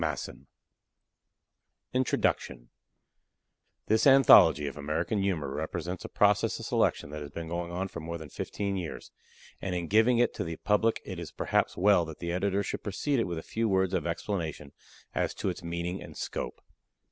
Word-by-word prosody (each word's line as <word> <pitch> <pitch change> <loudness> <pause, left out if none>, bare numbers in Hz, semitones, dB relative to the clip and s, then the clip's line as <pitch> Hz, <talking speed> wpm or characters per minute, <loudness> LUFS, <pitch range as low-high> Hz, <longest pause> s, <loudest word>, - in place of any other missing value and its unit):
Mark 80 -2 0
Twain] - - -9 1.5
INTRODUCTION 70 - 0 1.1
This 110 +5 +3
anthology 135 - +7
of 70 - -4
American 80 +7 -1
Humor 80 -9 -1
represents 85 +4 -4
a - - -7
process - - +3
of - - -7
selection 70 - +1
that 75 0 -6
has 75 - -6
been 85 +3 -6
going 85 +1 -3
on 95 +2 -2
for 85 - -8
more 85 +1 -5
than 80 -2 -10
fifteen 100 -1 -3
years, 90 -3 -6 0.5
and 95 -2 -2
in 85 -1 -2
giving 110 +5 +4
it 120 - +3
to - - -3
the 80 -1 -4
public 105 +5 +1
it 95 -3 -6
is 85 -3 -6
perhaps - - 0
well 100 -1 +5
that 80 -1 -8
the 85 0 -4
Editor 100 +2 0
should - - -4
precede 125 +7 -1
it - - +1
with 85 -1 -3
a 80 - -5
few 115 0 -1
words 95 -1 +2
of 85 -3 0
explanation 85 -5 -3 0.4
as - - -1
to - - -2
its - - -5
meaning 85 +2 -3
and - - -10
scope. - - -5
90 Hz, 180 wpm, -29 LUFS, 80-100 Hz, 1.5 s, anthology